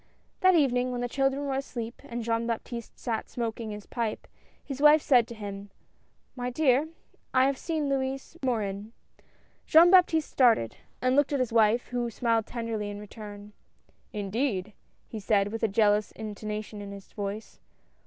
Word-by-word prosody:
That 370 -1 +5
evening, 255 -5 +2
when 245 -1 -3
the 245 - -1
children 270 +2 0
were 275 - -1
asleep 240 -3 -5
and 240 -4 -5
Jean 230 0 0
Baptiste 235 0 -5
sat 225 -3 -3
smoking 230 -1 -4
his 210 -1 -7
pipe, 230 -3 -3 0.4
his 275 -1 -6
wife 300 +1 +8
said 245 -4 +4
to 235 - -8
him: 200 -1 -7 0.7
"My 250 -1 -3
dear, 275 +2 +2 0.5
I 255 0 +6
have 275 0 +2
seen 315 -3 -2
Louis 270 +2 -2
Morin." 215 -4 -2 0.7
Jean 335 +3 +7
Baptiste 335 -4 +4
started, 230 - +3 0.3
and 255 0 +3
looked 290 0 +3
at 280 - +1
his 250 -3 -1
wife, 225 +1 +3
who 245 -1 -1
smiled 230 -1 0
tenderly 230 -3 -3
in 205 0 -6
return. 210 0 -10 0.6
"Indeed!" 210 -1 -2 0.3
he 220 - -6
said, 205 0 +1
with 225 - -4
a 225 - +3
jealous 210 0 +2
intonation 210 0 -6
in 200 0 -7
his 200 -1 -11
voice. 205 +1 -5
235 Hz, 165 wpm, -28 LUFS, 210-265 Hz, 0.7 s, wife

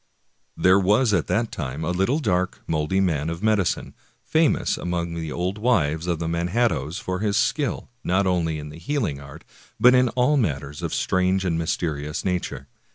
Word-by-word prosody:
There 95 +2 +5
was 105 +4 +3
at - - +1
that 115 +1 0
time 70 0 -4
a 85 - 0
little 95 +10 +1
dark, 90 - -1
moldy 80 +4 0
man 80 -5 0
of 85 +4 -5
medicine, 105 -4 +1 0.3
famous 160 -1 +2
among 85 -1 -3
the 80 -2 -4
old 90 +5 -2
wives 85 -9 +1
of 85 -2 0
the 80 0 -3
Manhattoes 85 - 0
for 90 -4 -3
his 105 0 0
skill, 135 +5 0 0.2
not 95 +3 +1
only 85 -4 0
in 75 -1 -7
the 75 +2 -11
healing 110 - -2
art, 70 +3 -12 0.4
but 125 +1 +7
in 125 -1 +4
all 125 +5 +2
matters 75 - -2
of - - -3
strange 95 +1 +1
and 85 -3 +1
mysterious 75 -2 -2
nature. 90 -7 -2
90 Hz, 175 wpm, -24 LUFS, 80-105 Hz, 0.4 s, but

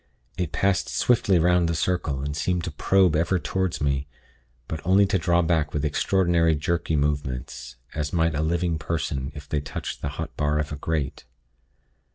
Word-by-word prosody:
It 90 -3 -2
passed 100 -2 +1
swiftly 105 -6 +3
'round 85 0 +3
the 85 - 0
circle, 80 -5 -1
and 75 0 -3
seemed 90 +2 0
to 80 - -3
probe 90 +2 +3
ever 85 +4 +2
toward 95 0 -2
me; 70 -1 0 0.6
but 80 - -4
only 95 +3 +5
to 95 -1 +1
draw 85 +1 +2
back 80 -3 0
with 75 0 0
extraordinary 85 +1 +2
jerky 80 +2 -1
movements, 65 -4 -2 0.2
as 75 -1 -2
might 80 -1 +2
a 75 - -1
living 85 0 0
person 70 -3 -2
if 75 0 -9
they 75 0 -1
touched 75 - -6
the 70 - -2
hot 80 -1 -5
bar 75 0 +1
of 75 0 -2
a - - -3
grate. 75 -1 -3
80 Hz, 180 wpm, -25 LUFS, 75-90 Hz, 0.6 s, only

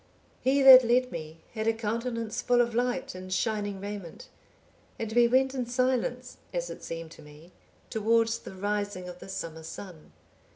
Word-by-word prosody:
(843) 260 - +4
"He 275 0 +3
that 260 -1 +11 0.2
led - - -17
me 160 -1 -8
had 220 -1 -3
a 225 - +4
countenance 230 0 -3
full 245 -1 +2
of 235 -1 +2
light, 245 +2 -1
and 185 0 -9
shining 205 0 -1
raiment, 200 -4 -8 0.7
and 225 -1 -4
we 240 0 +5
went 260 +2 +3
in 255 -3 -3
silence, 250 0 -1
as 175 -1 -3
it - - -10
seemed 165 -1 -6
to 165 - -13
me, 150 +3 -15 0.4
towards 225 +1 +2
the - - -10
rising 205 -1 -3
of 180 0 -9
the - - -11
summer 165 -4 -5
sun. 160 0 -10
215 Hz, 175 wpm, -28 LUFS, 180-245 Hz, 0.7 s, that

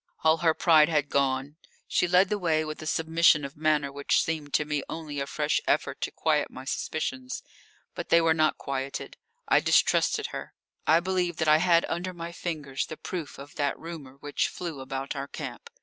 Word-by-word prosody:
All 160 0 +5
her 160 -1 +2
pride 160 -2 +5
had 150 -3 +1
gone; 140 +1 0 0.3
she - - +2
led 180 +2 +4
the 210 - -1
way 160 -3 +1
with 155 0 -6
a 155 - -6
submission 160 -2 +3
of 140 - -8
manner 150 -2 +1
which 140 0 +1
seemed 155 -3 -3
to 150 - +2
me 150 -1 -1
only 155 -3 -5
a 140 - -2
fresh 150 +1 0
effort - - 0
to - - -1
quiet - - 0
my 130 - -10
suspicions. 130 -2 -3 0.5
But - - -6
they 170 - +6
were 165 -1 +4
not 155 -1 +2
quieted. 135 0 -4 0.3
I - - +5
distrusted 440 -3 +2
her; - - -7 0.3
I 165 +2 +5
believed 180 -2 -1
that 160 - 0
I 155 0 +7
had 170 0 +4
under 180 +1 -3
my 170 0 -6
fingers 150 -6 -4
the 155 - -7
proof 170 -5 -6
of 140 +1 -11
that 145 -2 0
rumour 155 -5 -9
which 145 0 0
flew 170 -6 -6
about 135 +1 -4
our 135 0 -4
camp. - - -7
155 Hz, 195 wpm, -27 LUFS, 140-165 Hz, 0.5 s, I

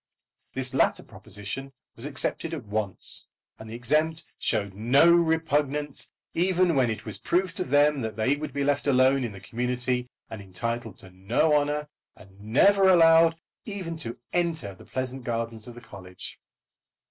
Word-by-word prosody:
This 130 0 -3
latter 135 - +2
proposition 135 +7 -7 0.2
was 115 - -7
accepted 150 +3 -3
at 135 -8 -8
once, 105 -2 0 0.3
and 110 - -10
the 110 - -7
exempt 155 +7 0
showed 100 -2 -1
no 125 - +4
repugnance 150 -4 0 0.2
even 180 -1 +2
when 130 -3 +3
it 110 - -4
was 110 - -4
proved 180 0 0
to 185 - +1
them 145 -3 +3
that 110 -2 -4
they 115 +6 +1
would 150 0 -6
be 140 +1 -2
left 145 +1 0
alone 130 0 +4
in 120 - -3
the 100 - -10
community 125 +3 -2 0.2
and 110 -2 -8
entitled 115 +3 -4
to 95 - -14
no 105 +12 +1
honour, 150 0 0 0.3
and 95 0 -18
never 190 - +4
allowed 165 -2 +6 0.3
even 190 -5 -5
to 120 -6 -4 0.2
enter 165 - -1
the 95 - -16
pleasant 130 0 -4
gardens 115 -1 -4
of 120 - -10
the 120 - -11
college. 90 -4 -11
130 Hz, 160 wpm, -26 LUFS, 110-160 Hz, 0.3 s, allowed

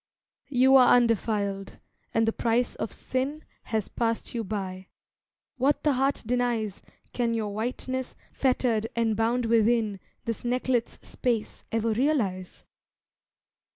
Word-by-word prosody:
You 265 0 +6
are 250 -2 +7
undefiled, 210 -4 0 0.3
and 225 0 +2
the 225 - +2
price 235 +1 +1
of - - -4
sin 275 +4 -3 0.2
Has 220 -3 -1
passed 230 -1 -2
you 230 -2 -2
by, 190 -3 -5 0.7
what 270 +3 +2
the 300 - +4
heart 270 +2 +1
denies 235 -4 -1 0.3
Can 235 -2 0
your 210 -2 -2
whiteness, 255 +4 -3 0.2
fettered 245 -4 +1
and 230 -2 +1
bound 230 +3 +1
within 225 -2 +2 0.3
This 230 -1 -3
necklet's 245 -1 0
space, 235 -4 -2
ever 225 0 +1
realise? 215 -8 -1
230 Hz, 120 wpm, -27 LUFS, 220-250 Hz, 0.7 s, are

